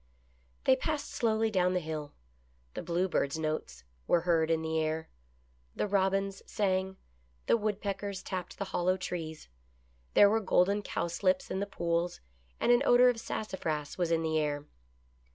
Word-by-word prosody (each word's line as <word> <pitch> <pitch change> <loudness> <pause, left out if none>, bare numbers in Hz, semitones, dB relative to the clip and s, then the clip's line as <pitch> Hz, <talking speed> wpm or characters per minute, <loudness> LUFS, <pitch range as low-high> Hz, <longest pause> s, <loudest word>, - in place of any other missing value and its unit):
They 260 - +5
passed 300 +2 -3
slowly 220 -1 +1
down 180 -2 +2
the - - +3
hill. 155 -3 -5 0.6
The - - -4
bluebirds' 170 -4 0
notes 155 - -3 0.2
were 175 - +4
heard 165 -2 +2
in 160 -1 +1
the 160 0 0
air. 160 +1 -2 0.7
The - - 0
robins 195 0 +1
sang. 190 -1 0 0.5
The - - +4
woodpeckers 200 -2 -3
tapped 185 -2 -5
the 200 - -3
hollow 185 +1 +2
trees. 165 - -5 0.7
There 205 - +8
were 220 +2 +3
golden 200 0 +2
cowslips 185 0 -1
in 190 - -1
the 200 - -2
pools, 170 -2 -1 0.4
and - - +3
an 240 +1 +5
odor 250 -1 +6
of 240 -2 -1
sassafras 160 -10 -3
was 175 -2 +1
in 165 -1 +1
the 160 -1 +1
air. 145 -1 -1
185 Hz, 150 wpm, -31 LUFS, 160-200 Hz, 0.7 s, There